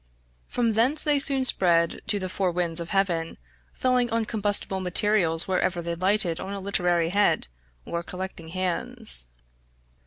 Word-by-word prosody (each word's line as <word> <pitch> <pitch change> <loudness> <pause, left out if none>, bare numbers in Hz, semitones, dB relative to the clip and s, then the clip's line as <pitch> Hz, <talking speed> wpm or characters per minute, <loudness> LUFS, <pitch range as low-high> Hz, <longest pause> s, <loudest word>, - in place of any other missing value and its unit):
From 235 -2 -1
thence 255 +8 +1
they 295 -2 +1
soon 275 -1 +2
spread 170 -7 +2
to 205 - 0
the 185 -2 -4
four 185 0 -2
winds 170 -1 -1
of 170 - -7
heaven, 175 -4 -1 0.3
falling 250 -1 0
on 230 -1 -1
combustible 205 -3 -2
materials 180 -2 +1
wherever 185 -1 -1
they 170 0 -3
lighted 185 -1 +2
on 195 +1 -6
a 200 - -5
literary 175 -4 0
head, 205 +3 +1 0.4
or 170 - -4
collecting 180 -1 -8
hands. 185 - +3
190 Hz, 150 wpm, -25 LUFS, 170-215 Hz, 0.4 s, hands